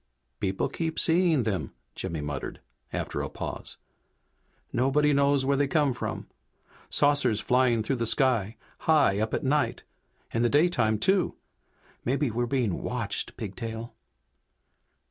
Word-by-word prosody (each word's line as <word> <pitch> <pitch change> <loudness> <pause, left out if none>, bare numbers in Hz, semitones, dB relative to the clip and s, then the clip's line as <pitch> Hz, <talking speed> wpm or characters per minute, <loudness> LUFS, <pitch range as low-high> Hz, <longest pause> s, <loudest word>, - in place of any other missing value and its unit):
'" - - -49
"People 95 0 0
keep 160 -1 -3
seeing 165 -5 +3
them!" 100 -7 -2 0.2
Jimmy 80 -2 -4
muttered, 75 -2 -5 0.3
after - - -3
a - - -3
pause. - - -4 1.0
"Nobody 145 +4 +3
knows 140 -1 +3
where 140 +1 +2
they 140 0 +2
come 145 -2 +2
from! 120 - -4 0.6
Saucers 145 -7 +3
flying 125 -2 +2
through 130 +4 -1
the 115 -1 -1
sky, 115 -5 +2 0.3
high 145 -11 +4
up 110 +1 0
at - - -3
night. 145 +2 +1 0.5
In 115 - +1
the 120 - +3
daytime, 140 -8 +3
too! 190 - +2 0.7
Maybe 135 +1 0
we're 120 +2 -1
being 120 -8 0
watched, - - -3
Pigtail!" 115 +3 -6
125 Hz, 135 wpm, -27 LUFS, 110-145 Hz, 1.0 s, high